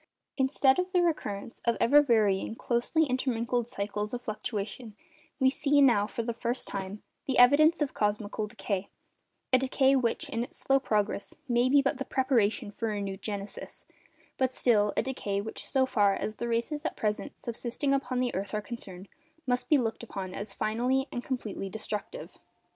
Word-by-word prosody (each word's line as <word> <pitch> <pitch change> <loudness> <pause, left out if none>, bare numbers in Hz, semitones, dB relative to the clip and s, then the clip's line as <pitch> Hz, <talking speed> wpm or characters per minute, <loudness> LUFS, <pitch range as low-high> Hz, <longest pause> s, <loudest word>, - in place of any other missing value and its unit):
Instead 265 +1 +3
of 365 0 -1
the 360 - +4
recurrence 230 -10 -2
of 235 -1 +2
ever 290 +5 +6
varying, 220 -6 +2
closely 245 +8 +1
intermingled 245 -3 0
cycles 210 -1 -3
of 245 - -7
fluctuation, 215 0 -5 0.4
we 265 - +4
see, 285 +2 +3
now 235 -7 +5
for 230 +2 -4
the 235 +1 -2
first 235 +2 -3
time, 195 +1 -5 0.2
the 265 - 0
evidence 295 +6 +6
of 285 - -4
cosmical 210 0 -1
decay—a 200 +5 -4
decay 265 +1 +3
which, 240 -3 0
in 230 +1 -1
its - - -9
slow 270 0 +2
progress, 210 -5 -1
may 245 0 +3
be 280 +1 +5
but 275 0 0
the - - -1
preparation 235 -5 +1
for 225 +2 -3
renewed 200 -2 -3
genesis—but 210 +5 -5
still, 210 -5 +3
a - - +3
decay 210 -7 -2
which, 220 +2 -6
so 265 -1 +3
far 205 -6 +3
as 215 - -4
the 235 - -3
races 235 +6 -1
at 325 - -2
present 210 +6 -2
subsisting 245 +3 -2
upon 255 -2 0
the 250 -1 0
earth 195 +2 -3
are - - +1
concerned, 195 -5 -8 0.4
must 250 -1 -1
be 300 - +6
looked 225 -4 -1
upon 195 -5 -6
as 205 0 -6
finally 250 +7 0
and 245 - -4
completely 220 -7 -4
destructive. 220 - -5
235 Hz, 170 wpm, -29 LUFS, 210-265 Hz, 0.4 s, ever